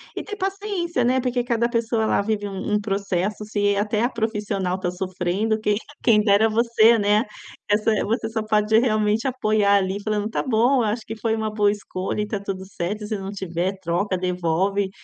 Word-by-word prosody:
e - - -3
ter 415 - -6
paciência, 385 - -2
né. 255 +2 +2
Porque 245 -1 0
cada 235 0 +1
pessoa 230 -1 0
ela 220 - +2
vive 205 0 -2
um 195 -1 -5
um 210 - +3
processo. 200 0 -2
Se 205 -1 +1
até 210 +1 0
a 245 - +2
profissional 210 -5 -2
tá 180 -2 -2
sofrendo, 185 +4 -1
que 210 -1 +2 0.3
quem 215 -3 +5
dera 210 +1 +4
você, 230 0 +4
né. 210 +1 +3 0.5
Essa 210 +2 +2
você 225 +1 -1
só 220 -1 -2
pode 215 0 +2
realmente 215 -1 +1
apoiar 215 -5 +2
ali 195 0 0
falando: 210 -1 -1
"Tá - - -2
bom, 250 +1 +3
eu - - +1
acho 220 +1 -2
que 225 - -6
foi 220 0 -1
uma 220 -1 -3
boa 205 -1 +3
escolha", 200 -1 -4
e - - +1
está 210 -1 -3
tudo 195 -1 -5
certo. 200 +3 -4
Se 215 -1 -2
não 195 0 -6
tiver, 190 0 -3
troca, 185 +2 -1
devolve, 180 +2 0
210 Hz, 195 wpm, -23 LUFS, 195-225 Hz, 0.5 s, quem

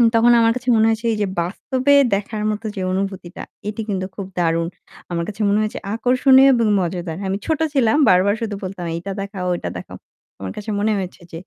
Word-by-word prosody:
তখন 235 +1 +5
আমার 230 0 +4
কাছে 255 0 -3
মনে 220 0 +4
হয়েছে, 225 +1 -1
এই - - -3
যে 200 - +1
বাস্তবে 260 +10 0 0.2
দেখার 210 +1 -4
মতো 215 +2 -5
যে 190 - -4
অনুভূতিটা 190 -2 -4 0.2
এটি 215 +2 -3
কিন্তু 190 -2 -1
খুব 200 - -5
দারুণ। 165 0 +1 0.4
আমার 170 -1 -1
কাছে 215 +1 -6
মনে 205 +1 +3
হয়েছে 215 0 -3
আকর্ষণীয় 260 +3 +5
এবং 230 -2 +2
মজাদার। 175 -2 -3
আমি 195 +1 -1
ছোট 315 -1 0
ছিলাম 255 -1 +3
বারবার 190 +3 +4
শুধু 215 -2 -3
বলতাম 185 -2 -5
এইটা 180 +4 -5
দেখাও, 195 -2 -5
ঐটা - - -4
দেখাও। - - -10 0.4
আমার 95 -1 -5
কাছে 210 +1 -6
মনে 215 +1 +1
হয়েছে 185 -2 -6
যে, 165 - -6
205 Hz, 200 wpm, -20 LUFS, 185-230 Hz, 0.4 s, তখন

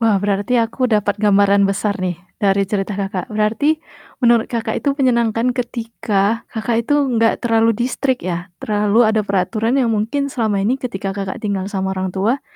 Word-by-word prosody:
Wah, 225 -3 +3
berarti 205 +4 0
aku 235 +2 0
dapat 210 -2 0
gambaran 200 -1 +4
besar 200 +1 -1
nih 180 -2 -2 0.2
dari 200 -1 +3
cerita 200 0 -2
Kakak 200 +6 -3
berarti, 220 +8 +1 0.5
menurut 235 -2 +4
Kakak 225 -2 -2
itu 280 -1 0
menyenangkan 235 -2 +2
ketika 230 -3 -1
Kakak 230 0 -2
itu 290 - +3 0.2
enggak 225 -1 +2
terlalu 225 -1 +3
di-strict 255 +2 -1
ya? 175 0 -3
terlalu 210 +2 +2
ada 220 0 +2
peraturan 215 +5 0
yang 240 -3 +2
mungkin 225 +7 -1
selama 220 -5 0
ini 255 +6 +1
ketika 195 -6 -4
Kakak 195 -1 -4
tinggal 200 -2 -2
sama 190 -2 -2
orang 190 0 -2
tua, 215 +9 0
220 Hz, 165 wpm, -19 LUFS, 200-235 Hz, 0.5 s, gambaran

